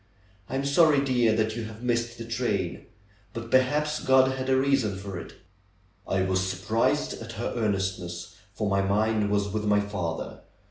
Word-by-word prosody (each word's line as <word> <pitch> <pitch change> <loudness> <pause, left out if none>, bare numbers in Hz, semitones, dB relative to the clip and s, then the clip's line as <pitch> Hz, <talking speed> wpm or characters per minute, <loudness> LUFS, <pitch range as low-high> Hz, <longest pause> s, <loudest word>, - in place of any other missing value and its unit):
I - - -3
am 135 +1 -1
sorry, 145 0 +5
dear, 120 -4 +3
that 110 0 0
you 115 -1 -4
have 110 +2 -10
missed 120 -1 -1
the 115 - -6
train. 115 -7 -2 0.5
But 115 0 -6
perhaps 150 +4 +2
God 130 0 +5
had 130 0 -3
a 130 - +4
reason 135 -7 +1
for 95 -2 -6
it." - - -10 0.7
I 95 -1 +1
was 95 0 +1
surprised 105 +11 0
at 115 +1 -7
her 115 +1 -3
earnestness, 95 -5 -2 0.2
for 105 - -1
my 100 -1 +2
mind 105 +2 +1
was 100 0 +1
with 105 +1 -2
my 105 0 +4
father. 100 -5 -4
110 Hz, 175 wpm, -27 LUFS, 100-130 Hz, 0.7 s, sorry